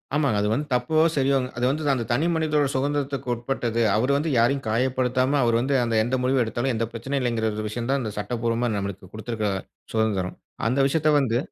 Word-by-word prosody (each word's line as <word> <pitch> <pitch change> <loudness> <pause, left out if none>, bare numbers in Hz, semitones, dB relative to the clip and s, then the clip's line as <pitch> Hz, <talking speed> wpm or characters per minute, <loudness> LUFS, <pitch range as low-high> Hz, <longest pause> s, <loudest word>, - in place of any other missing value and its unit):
ஆமாங்க. 140 -8 +2
அது 105 - +1
வந்து 145 +6 -2
தப்போ 125 +6 0 0.2
சரியோங்க, 135 -2 +2
அது 120 - +1
வந்து 150 +1 -1
அந்த 120 - -1
தனி 135 +7 +2
மனிதனுடைய 150 -3 +1
சுகந்திரத்துக்கு 140 -1 -1
உட்பட்டது. 120 -1 -2
அவரு 125 +6 +2
வந்து 155 +3 -1
யாரையும் 135 +4 +2
காயப்படுத்தாம, 130 +3 +1
அவரு 115 -1 +2
வந்து 140 +2 0
அந்த 115 -1 -1
எந்த 120 +3 -1
முடிவு 130 0 +2
எடுத்தாலும், 120 +3 -1
எந்த 115 0 -1
பிரச்சனையும் 135 +4 -2
இல்லைங்கிற 115 -3 0 0.2
விஷயம் 120 +3 -4
தான் 140 0 +1
இந்த 110 -2 -4
சட்டபூர்வமா 115 +2 -1
நமக்கு 100 -2 -5
குடுத்திருக்கிற 110 -1 -2 0.4
சுதந்திரம். 105 -5 0 0.3
அந்த 125 +4 +1
விஷயத்தை 155 +1 +2
வந்து 120 -4 +1
125 Hz, 180 wpm, -24 LUFS, 115-140 Hz, 0.4 s, ஆமாங்க